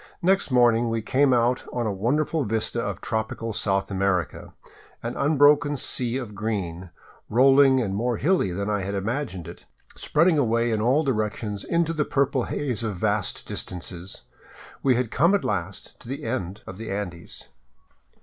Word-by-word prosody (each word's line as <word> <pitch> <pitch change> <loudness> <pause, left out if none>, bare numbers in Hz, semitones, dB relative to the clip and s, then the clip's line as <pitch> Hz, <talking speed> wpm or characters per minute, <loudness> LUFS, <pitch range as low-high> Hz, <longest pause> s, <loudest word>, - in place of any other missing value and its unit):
Next 190 0 +2
morning 120 -2 +4
we 115 -1 -2
came 135 +4 +3
out 120 0 +2
on 120 -1 -2
a 105 - -1
wonderful 145 +9 0
vista 115 +1 -1
of - - -4
tropical 110 0 -3
South 95 -1 -1
America, 95 -3 -1 0.5
an 115 +1 -4
unbroken 145 0 +4
sea 125 -1 -2
of 120 -6 -6
green, 95 -4 -4 0.4
rolling 135 +2 +5
and 105 -6 -1
more 120 +3 -1
hilly 175 - +2
than 100 +3 -3
I 105 -1 0
had 100 +2 -3
imagined 100 - -3
it, - - -11 0.3
spreading 165 0 +2
away 115 -2 +1
in 110 -1 0
all 130 +7 +3
directions 105 -5 -2
into 170 -1 0
the 155 -2 +1
purple 135 -3 0
haze 125 -6 -2
of 105 -3 -2
vast 105 +1 -1
distances. 90 +1 -6 0.6
We 130 -2 +3
had 120 -2 -1
come 170 +9 +4
at 200 - -1
last 95 -2 -4
to - - -14
the 135 +3 -5
end 105 -4 -4
of 95 - -9
the 115 - -6
Andes. 95 -4 -6
115 Hz, 165 wpm, -25 LUFS, 100-135 Hz, 0.6 s, rolling